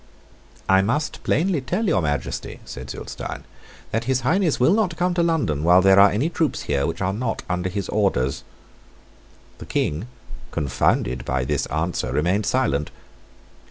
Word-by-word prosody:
"I 95 0 +5
must 125 +10 -1
plainly 170 -1 +1
tell 185 - -1
your 160 - +2
Majesty," 75 -2 -3
said 65 +1 -8
Zulestein, - - -6 0.5
"that 115 +2 -1
His 130 0 +1
Highness 165 +5 +1
will 130 +8 +4
not 200 -6 +1
come 180 0 +1
to 175 - +1
London 150 - 0
while 90 +2 +5
there 95 0 +6
are 100 +1 +8
any 115 +10 0
troops 165 -2 -1
here 70 -1 0
which 85 +2 -4
are 95 +1 0
not 115 +2 -3
under 90 0 -1
his 100 +1 -3
orders." 80 -11 0 1.2
The - - -9
King, 80 +10 -1 0.4
confounded 65 -2 0
by 65 0 -1
this 75 +1 -1
answer, 80 +3 -2
remained 95 +7 +1
silent. 75 - +1
100 Hz, 160 wpm, -23 LUFS, -, 1.2 s, are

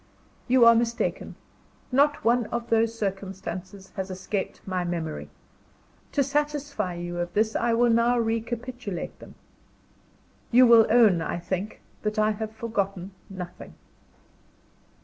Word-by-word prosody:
You 250 -1 +5
are 235 - +9
mistaken: 235 0 -1 0.6
not 285 +3 +3
one 235 -1 +3
of 235 +1 -4
those 230 0 +2
circumstances 195 -1 -5
has 190 0 -4
escaped 190 +1 -4
my 185 -2 -2
memory. 170 -3 -4 0.8
To 280 - +3
satisfy 285 -8 -2
you 175 0 -5
of 175 0 -2
this, 220 +1 +1
I 235 0 +1
will 240 +1 +4
now 235 +2 +3
recapitulate 230 -2 -3
them. - - -13 1.1
You 250 +2 +7
will 230 -2 +7
own, 215 -7 +5
I 165 - -2
think, 185 +4 -4 0.2
that 210 0 -2
I 215 0 +3
have 215 0 -4
forgotten 200 -4 -3 0.2
nothing. 180 -2 -9
220 Hz, 130 wpm, -26 LUFS, 190-235 Hz, 1.1 s, are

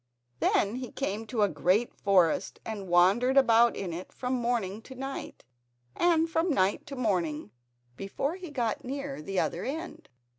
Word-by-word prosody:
Then 205 +4 +2
he 255 -1 -6
came 220 -4 -3
to 220 -2 +1
a - - +5
great 200 +5 +1
forest 185 -5 +2
and 210 -4 -5
wandered 195 +10 +4
about 235 -3 +5
in 180 -4 -4
it 175 +3 -7
from 250 0 -3
morning 235 -5 -1
to 260 - -12
night 270 +1 -6 0.5
and 330 -2 +3
from 325 +2 0
night 195 - +1
to 280 - -6
morning 175 - -1 0.5
before 270 +10 -2
he 370 -3 -8
got 240 -6 -2
near 275 - -5
the 190 +4 -2
other 175 - -1
end. 320 +6 -6
230 Hz, 160 wpm, -29 LUFS, 195-270 Hz, 0.5 s, a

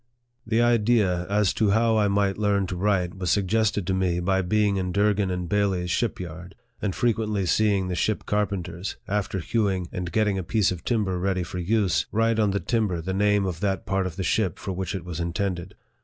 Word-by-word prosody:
The 115 +1 +2
idea 105 -6 +2
as 100 -1 +2
to 110 - +1
how 110 +2 +3
I 105 -1 +3
might 100 0 +1
learn 100 -2 +2
to 90 - -4
write 90 -2 0
was 90 -2 -1
sug 100 +4 +2
gested 110 0 +1
to 95 - 0
me 90 -2 0
by 95 +2 +1
being 100 +2 +1
in 90 -1 -2
Durgin 100 0 +2
and 90 -1 -3
Bailey's 95 -3 0
ship 115 +3 0
yard, 90 +1 -8 0.3
and 100 -4 -1
frequently 110 -4 0
seeing 100 0 +2
the 90 - -2
ship 105 +4 -1
carpenters, 95 -3 -2
after 105 0 -1
hewing, 95 -2 0
and 90 -1 -4
getting 105 -3 +1
a - - -3
piece 105 +2 +1
of 90 -2 -5
timber 100 -6 0
ready 95 0 0
for 90 +1 -6
use, 100 +1 +1
write 115 +1 +2
on 105 -2 +3
the 100 +1 0
timber 105 -8 0
the 95 +3 -3
name 105 0 +2
of 90 -4 -3
that 95 -1 -1
part 95 -1 0
of 85 - -7
the 95 - -3
ship 95 +1 0
for 95 - -5
which 95 0 -3
it 90 -3 -5
was 85 -3 -5
intended. 90 +2 -3
95 Hz, 215 wpm, -25 LUFS, 90-105 Hz, 0.3 s, how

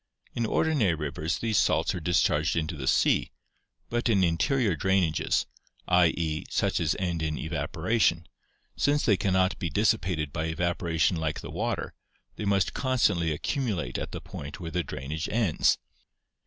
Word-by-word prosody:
In 115 -1 -1
ordinary 130 - +2
rivers 75 +1 -3
these 110 -4 +1
salts - - +2
are - - -3
discharged 80 -2 +2
into 80 0 -1
the 65 -3 -5
sea, - - +3 0.6
but 120 0 -1
in 100 -4 +3
interior 90 +5 +2
drainages 90 -1 +1 0.4
[i. 90 -1 +5
e.9 80 -2 -3
such - - +1
as 80 -3 +1
end 90 -3 -2
in 75 -1 -1
evaporation] 80 +3 0 0.5
since 145 +1 +1
they 105 - +5
cannot 95 0 +1
be 90 - -2
dissipated 90 -6 0
by 80 -1 -2
evaporation 85 0 0
like 80 -1 -2
the - - -8
water, - - -2 0.4
they 105 - -5
must 100 -2 +1
constantly 105 -11 +1
accumulate 95 - -2
at - - -5
the - - -5
point 70 +1 -8
where 85 -2 -6
the 90 - 0
drainage 75 +4 -5
ends. 105 -8 +2
85 Hz, 155 wpm, -27 LUFS, 80-100 Hz, 0.6 s, i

